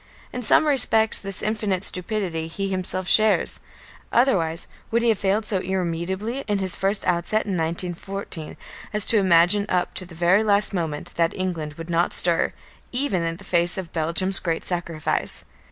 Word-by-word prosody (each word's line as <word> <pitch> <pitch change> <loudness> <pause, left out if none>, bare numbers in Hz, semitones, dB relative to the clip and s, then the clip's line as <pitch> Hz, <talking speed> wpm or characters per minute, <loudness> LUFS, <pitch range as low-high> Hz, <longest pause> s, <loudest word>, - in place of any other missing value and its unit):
In 250 - -4
some 250 - +3
respects 225 -6 +5
this 195 -1 -3
infinite 210 -3 -1
stupidity 180 -5 -2
he 195 +4 -4
himself 185 -1 0
shares. 215 +2 +4 0.5
Otherwise 175 -10 +1 0.2
would 235 +1 0
he 235 - +3
have 220 - +1
failed 205 +2 0
so 200 -3 -1
irremediably 190 +5 -3
in 205 -1 0
his 190 -2 -2
first 195 +1 0
outset 180 +5 0
in 195 - -2
1914 170 +1 -3 0.4
as 210 -1 +2
to 225 - +2
imagine 185 +2 +3
up 180 -1 -1
to 185 - -4
the 170 - -13
very 175 +5 +3
last 210 -1 +1
moment 160 -5 -4
that 165 -1 +1
England 165 -5 -4
would 165 +1 -8
not 170 +1 +1
stir, 170 -1 +5 0.4
even 245 -8 -1
in 165 0 -3
face 175 -2 0
of 185 -3 -7
Belgium's 170 +4 +1
great 165 -2 -3
sacrifice. 170 -3 -3
185 Hz, 165 wpm, -23 LUFS, 170-210 Hz, 0.5 s, respects